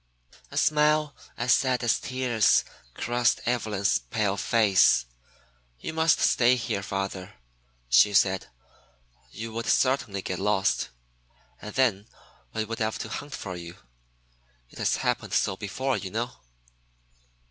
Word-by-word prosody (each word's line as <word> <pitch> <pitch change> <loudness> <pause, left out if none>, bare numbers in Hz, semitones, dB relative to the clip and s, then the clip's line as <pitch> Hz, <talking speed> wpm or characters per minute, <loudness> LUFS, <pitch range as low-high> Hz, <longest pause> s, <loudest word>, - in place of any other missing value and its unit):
A - - -8
smile 150 -1 +2 0.2
as 120 0 +3
sad 130 -2 +1
as 120 - +2
tears 125 -5 +2 0.3
crossed 120 0 +1
Evelyn's 110 -5 0
pale 105 -3 -1
face. 100 - +3 0.7
"You 160 - -5
must 160 0 +3
stay 120 +1 +4
here, 115 -5 -3
father," 95 0 -5 0.5
she 65 +12 +5
said. 95 -7 +3 0.8
"You 115 0 -7
would 115 +1 -4
certainly 130 -7 +1
get 90 - -4
lost, 100 -1 +1 0.7
and 105 - -8
then 110 -6 +1 0.4
we 110 - -2
would 115 +1 -6
have 110 -1 -1
to - - -6
hunt 145 -2 -6
for 95 -3 -6
you. 85 0 -9 1.0
It - - -13
has - - +1
happened - - -2
so 95 - +1
before, 130 +7 -2
you 95 - -6
know." 120 +5 -3
110 Hz, 130 wpm, -26 LUFS, 100-125 Hz, 1.0 s, she